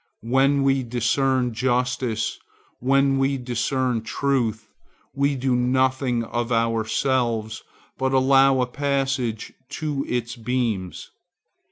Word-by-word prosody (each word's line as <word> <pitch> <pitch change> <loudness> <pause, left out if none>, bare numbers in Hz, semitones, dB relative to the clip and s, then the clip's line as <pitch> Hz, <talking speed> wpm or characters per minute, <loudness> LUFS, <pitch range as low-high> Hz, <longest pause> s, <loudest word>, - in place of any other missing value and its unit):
When 135 +3 +3
we 135 -1 +2
discern 125 +1 0
justice, 125 -2 -1 0.4
when 135 +1 +2
we 135 +1 +1
discern 125 0 -1
truth, 115 -1 -1 0.5
we 140 +1 +1
do 130 -1 0
nothing 130 0 +1
of 120 +1 -3
ourselves, 115 0 0 0.4
but 130 0 0
allow 135 0 +4
a - - +2
passage 135 -4 -2 0.2
to 145 -2 -3
its 120 -1 -2
beams. 115 -6 -3
125 Hz, 100 wpm, -23 LUFS, 115-135 Hz, 0.5 s, allow